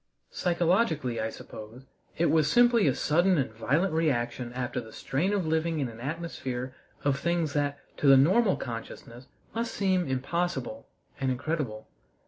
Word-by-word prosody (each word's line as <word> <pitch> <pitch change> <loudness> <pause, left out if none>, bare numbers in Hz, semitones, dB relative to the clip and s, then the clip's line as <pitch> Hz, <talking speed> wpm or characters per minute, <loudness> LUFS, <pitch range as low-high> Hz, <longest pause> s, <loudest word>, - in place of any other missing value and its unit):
Psychologically, 170 - +1
I 110 - -1
suppose, 110 +3 -10 0.3
it 170 - +2
was 155 -2 +3
simply 240 -5 +5
a 135 - +2
sudden 175 +4 +3
and 135 -5 0
violent 150 - +1
reaction 125 -6 0
after 125 0 -3
the 110 -1 -12
strain 160 - -1
of 200 -4 0
living 160 0 0
in 135 -4 -1
an 115 0 -11
atmosphere 130 -3 -4 0.3
of 140 -1 +1
things 170 -1 0
that 145 -1 0 0.2
to 145 - +1
the 135 -1 +9
normal 190 - +4
consciousness 120 +1 -8 0.3
must 230 0 -3
seem 185 -3 +1
impossible 130 -3 -2 0.3
and 135 -1 0
incredible. 130 -4 -3
145 Hz, 150 wpm, -28 LUFS, 125-170 Hz, 0.3 s, the